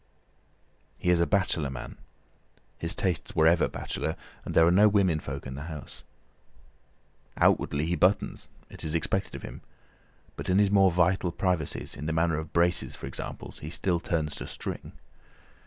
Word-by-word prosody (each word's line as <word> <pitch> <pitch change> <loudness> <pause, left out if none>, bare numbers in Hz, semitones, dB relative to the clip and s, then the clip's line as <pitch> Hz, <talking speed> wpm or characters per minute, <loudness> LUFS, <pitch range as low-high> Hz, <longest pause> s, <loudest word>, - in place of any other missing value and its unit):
He 90 - +1
is 90 - +4
a 85 - +3
bachelor 90 -7 +1
man—his 65 +5 -9
tastes 90 -6 -2
were 80 - +4
ever 85 +1 +5
bachelor, 80 - -3 0.3
and - - -6
there 80 - +7
are 85 - +5
no 100 +4 +6
women 95 -6 +3
folk 70 -2 -6
in 65 - -5
the 70 +3 -6
house. 75 -3 -8 1.4
Outwardly 75 +2 +2
he 85 +2 0
buttons—it 95 +4 -1
is 80 +1 -2
expected 80 - -1
of - - -8
him—but - - -12
in 90 - +4
his 100 -1 +4
more 95 -2 +6
vital 90 +1 +2
privacies, 90 -4 -1
in 75 - -5
the 80 - 0
matter 80 -1 +2
of 80 0 -5
braces 85 +1 +2
for - - -8
example, - - -6
he 75 - -6
still 85 +1 0
turns 80 -3 -1
to - - -6
string. - - -6
85 Hz, 160 wpm, -28 LUFS, 75-90 Hz, 1.4 s, there